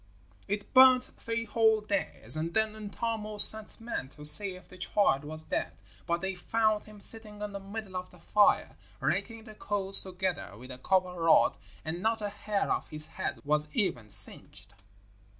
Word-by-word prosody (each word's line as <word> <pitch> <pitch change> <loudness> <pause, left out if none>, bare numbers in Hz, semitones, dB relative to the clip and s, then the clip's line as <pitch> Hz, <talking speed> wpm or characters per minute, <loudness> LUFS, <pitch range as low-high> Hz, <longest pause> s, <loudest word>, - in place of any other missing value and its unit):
It 205 +1 -5
burned 255 -1 +7
three 230 -2 -5
whole 220 -1 +2
days, 200 - 0
and 165 +2 -3
then 220 -1 +1
Untamo 215 0 -5
sent 220 +2 +5
men 225 - -5
to 150 +1 -7
see 190 +5 +4
if 185 - -15
the 185 - -15
child 180 -7 +1
was 155 +1 -9
dead; - - -4 0.3
but 170 0 -1
they 190 0 -3
found 215 +3 -1
him 215 -1 -14
sitting 210 0 -2
in 210 0 -5
the 200 - -5
middle 195 0 -8
of 180 0 -5
the 180 - -18
fire 210 +4 +2 0.2
raking 225 -1 -2
the 215 -1 -12
coals 200 -2 +2
together 185 - -4
with 125 +3 -11
a 130 - -10
copper 180 +2 0
rod, 165 -1 +4 0.3
and 165 +3 -4
not 225 +2 0
a 205 -1 -4
hair 205 0 -3
of - - -2
his 155 -1 +3
head - - -4
was 150 +1 0
even 120 - -2
singed. 100 0 +1
200 Hz, 180 wpm, -29 LUFS, 170-215 Hz, 0.3 s, burned